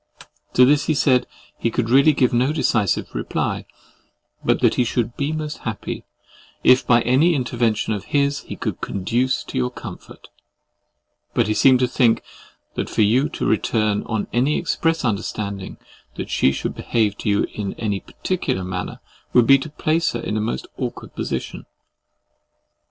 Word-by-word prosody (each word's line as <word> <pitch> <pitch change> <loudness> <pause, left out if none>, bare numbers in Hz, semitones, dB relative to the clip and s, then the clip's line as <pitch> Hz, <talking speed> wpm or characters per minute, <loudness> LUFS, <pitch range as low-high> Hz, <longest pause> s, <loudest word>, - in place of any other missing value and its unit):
To 125 - +7
this, 145 +2 +3
he 155 - +1
said, 130 -2 +3 0.3
he 115 - +1
could 115 0 -1
really 140 +4 +6
give 130 -3 +2
no 125 +4 +2
decisive 115 - 0
reply, - - -2 0.8
but - - +2
that - - +4
he 125 - +2
should 120 0 -1
be 140 +2 -1
most 155 -1 -4
happy - - -5 0.6
if, 130 +1 +5
by 120 -1 +5
any 150 +8 +3
intervention 120 -4 0
of 105 - -5
his, 140 0 +1
he - - -8
could - - -4
conduce 120 +7 -1
to - - -4
your 60 0 +1
comfort; - - -11 1.1
but - - +3
he 110 - 0
seemed 130 +4 +5
to 125 - +3
think 120 -2 +2 0.5
that - - -3
for 110 - +2
you 125 +8 +3
to - - -4
return 110 -1 +1
on 110 -2 -1
any 130 +5 +2
express 165 -3 0
understanding 100 -2 -3 0.4
that - - -6
she 65 - +3
should 70 - -3
behave 110 -4 0
to - - -2
you 100 0 +2
in 100 -2 -4
any 105 -3 -2
particular 175 - -3
manner, 90 0 -5 0.3
would 120 -2 +6
be 135 +3 +6
to 155 - -6
place 155 +2 0
her 120 - -2
in 105 - -3
a 110 - 0
most 65 - -3
awkward - - -5
situation. - - -4
120 Hz, 170 wpm, -21 LUFS, 105-140 Hz, 1.1 s, To